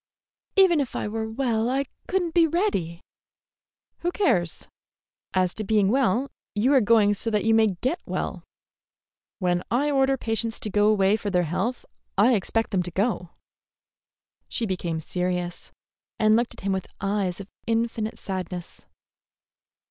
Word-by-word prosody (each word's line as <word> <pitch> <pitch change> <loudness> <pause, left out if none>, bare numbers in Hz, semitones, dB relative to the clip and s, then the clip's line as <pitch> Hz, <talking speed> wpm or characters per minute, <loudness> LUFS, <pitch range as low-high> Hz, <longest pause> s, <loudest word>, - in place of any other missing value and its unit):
"Even 375 -5 +6
if 275 -4 -2
I - - -2
were 220 +1 -3
well, 230 -1 0
I 270 +2 +1 0.2
could 380 -1 +1
n't 335 -2 -4
be 340 -2 +5
ready." 295 - -1 1.0
"Who 350 - -1
cares? 180 - +1 0.7
As 185 -1 +2
to 215 - -5
being 210 -1 +3
well, 255 +1 +2 0.2
you 240 +7 +3
are 265 - +6
going 210 -1 +4
so 215 +3 -1
you 225 +2 +2
may 220 0 +5
get 265 +8 0
well. - - -3 0.9
When 175 -2 +1
I 280 +5 +1
order 270 -1 +3
patients 225 -1 -2
to 210 - -3
go 205 +1 +3
away 205 -1 +4
for 205 - -3
their 180 -2 +2
health, 225 +10 -2 0.3
I 225 +6 +5
expect 225 +2 0
them 190 -3 +2
to 175 - -4
go." 190 -1 -1 1.2
She 235 - -1
became 175 -5 -2
serious, 180 +1 -3 0.5
and 215 0 +4
looked 235 +1 0
at - - -13
him 195 - -1
with 190 -1 -2
eyes 195 -2 -1
of 200 0 -9 0.2
infinite 230 -1 -1
sadness. 180 -2 -6
215 Hz, 155 wpm, -25 LUFS, 190-250 Hz, 1.2 s, Even